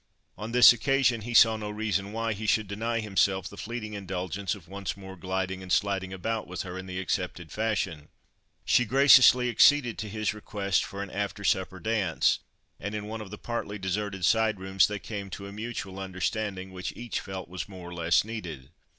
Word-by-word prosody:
On 110 +2 -6
this 125 0 +9
occasion, 125 -1 +2
he 120 +2 -5
saw 110 -1 +7
no 105 -1 -5
reason 105 -2 -2
why 115 0 -1
he 110 +1 -5
should 110 0 +2
deny 115 +4 -2
himself 95 -2 +1
the - - -10
fleeting 110 0 -5
indulgence 95 -1 -3
of 90 -4 -15
once 100 +1 -5
more 95 -1 -9
gliding 95 0 -3
and 95 -1 -8
sliding 95 -1 +1
about 110 +4 -3
with 90 -1 -4
her 90 -1 -7
in 95 0 -7
the 90 0 -4
accepted 90 -3 -3
fashion. 95 -9 -2 0.6
She 125 - +4
graciously 130 0 +7
acceded 120 +1 +4
to 105 - -4
his 110 0 -1
request 100 -2 -1
for 100 0 -5
an 100 - -9
after 100 0 -3
supper 95 -1 0
dance, 105 -7 +1 0.4
and 100 +3 -4
in 105 -1 -4
one 110 +1 -5
of 105 - -8
the 105 - -8
partly 110 -3 -4
deserted 95 -1 -2
side 110 -1 +3
rooms 95 0 +3
they 105 - -3
came 100 -1 -6
to 100 +2 -7
a 100 - -8
mutual 105 -3 -5
understanding, 95 +1 -3
which 90 -1 -5
each 120 -2 -3
felt 95 -2 -7
was 90 +3 -6
more 90 -3 -9
or - - -8
less 85 +2 +2
needed. 85 - -7
100 Hz, 195 wpm, -28 LUFS, 95-110 Hz, 0.6 s, this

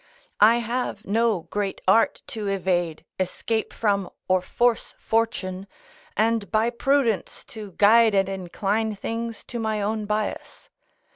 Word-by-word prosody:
I 220 +3 +7
have 240 -2 -3
no 220 -2 +1
great 200 +3 -3
art 220 +4 +3
to 220 -6 -4
evade, 175 -4 -1
escape 220 +4 -2
from 200 -4 0 0.2
or 185 0 +3
force 240 +5 0
fortune, 200 -4 -1 0.5
and 225 -1 +1
by 225 +2 +2
prudence 245 -3 0
to 210 -4 -8
guide 220 +3 +5
and 195 -1 +3
incline 195 +3 -2
things 230 +2 -4
to 240 - -6
my 220 -1 -1
own 210 +1 -2
bias. 210 0 -4
215 Hz, 130 wpm, -24 LUFS, 195-230 Hz, 0.5 s, I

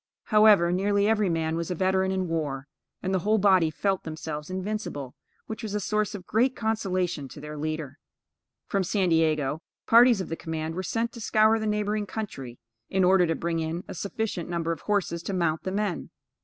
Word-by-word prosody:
However, 210 -5 +5
nearly 200 +2 +2
every 215 -3 +2
man 160 -1 0
was 170 0 -3
a 180 - -1
veteran 190 +1 +1
in 190 -1 -1
war, 145 -5 -3 0.4
and 190 0 -1
the 190 - +2
whole 215 +5 +2
body 190 -5 +4
felt 190 +4 -1
themselves 155 -1 -6
invincible, 185 -8 -4 0.3
which 220 - -6
was 215 -3 -4
a - - +1
source 210 +1 -1
of 185 -3 -8
great 250 +4 +2
consolation 185 -9 -1
to 135 +3 -11
their 150 +1 -7
leader. 155 -1 -4 0.7
From 195 -1 0
San 185 0 +1
Diego, 155 -2 +1 0.2
parties 235 -1 +6
of 185 - -4
the 165 - -2
command 160 -1 -4
were 185 - -3
sent 230 +5 -1
to 235 - -10
scour 220 +1 +4
the 220 - -2
neighboring 210 0 -1
country, 135 - -6 0.3
in 190 0 +2
order 180 -1 +5
to 165 - 0
bring 170 -1 -2
in 165 +3 -3
a - - -6
sufficient 200 -1 -3
number 170 -1 -1
of 165 - -4
horses 195 -5 -1
to 195 - -4
mount 170 -3 0
the 185 - -1
men. 200 -4 -2
185 Hz, 195 wpm, -27 LUFS, 160-210 Hz, 0.7 s, parties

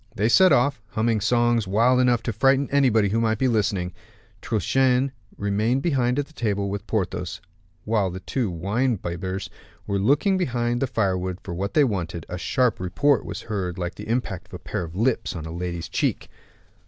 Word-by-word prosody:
They 110 +3 +1
set 185 +8 +6
off, 140 -2 +3
humming 110 -1 0
songs 120 -2 +2
wild 115 +6 +3
enough 120 -2 +3
to 115 - -2
frighten 135 +5 +3
anybody 120 -7 +3
who 115 +3 +1
might 110 -1 +1
be 130 - +2
listening. 100 -6 0 0.5
Truchen 130 +5 +2 0.3
remained 105 +6 0
behind 130 -6 +1
at 145 - 0
table 100 -3 -1
with 100 +1 -5
Porthos. 90 -4 -2 0.5
While 105 -3 +1
the 90 +1 -6
two 115 +4 -2
wine 105 +8 0
bibbers 95 +2 -4 0.4
were 100 0 -1
looking 150 - +3
behind 120 -6 0
the 135 - +1
firewood 95 -6 -1
for 85 - -6
what 95 +4 -3
they 150 - +6
wanted, 90 -8 -2
a 90 - -5
sharp 125 +4 +1
report 130 +10 +2
was - - -5
heard 95 -5 -3
like 90 -1 -3
the - - -9
impact 115 -7 -2
of - - -10
a - - -4
pair - - -4
of 85 0 -8
lips 115 -1 0
on 80 -2 -5
a 80 - -6
lady's 85 0 -4
cheek. - - -1
110 Hz, 185 wpm, -24 LUFS, 95-125 Hz, 0.5 s, set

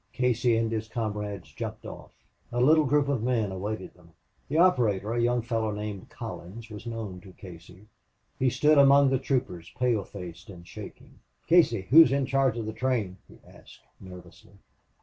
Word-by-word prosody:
Casey 120 -2 +1
and 115 0 -1
his 110 -1 -3
comrades 105 -6 -5
jumped - - -7
off. - - -10 0.4
A 120 - -2
little 155 +5 +5
group 145 +1 +2
of 140 -5 -1
men 115 -4 0
awaited 105 +4 -5
them. 85 -2 -22 0.4
The 150 - -1
operator, 115 - +2
a 120 - 0
young 120 0 +1
fellow 115 -2 -1
named 105 -2 -6
Collins, 110 +6 -9
was 105 +2 -9
known 110 -6 -6
to 95 -1 -14
Casey. 90 +2 -13 0.5
He 130 - +3
stood 150 +4 +3
among 140 0 +6
the 135 - +1
troopers, 95 -11 -3
pale 120 -5 +1
faced 90 -2 -10
and 85 -3 -12
shaking. - - -12 0.3
"Casey, 165 - +4
who's 160 +1 +8
in 140 0 +1
charge 135 -2 +1
of 115 - -4
the 110 - -5
train?" 110 -6 -2
he - - -17
asked, - - -17 0.2
nervously. 90 -2 -14
115 Hz, 170 wpm, -27 LUFS, 100-130 Hz, 0.5 s, who's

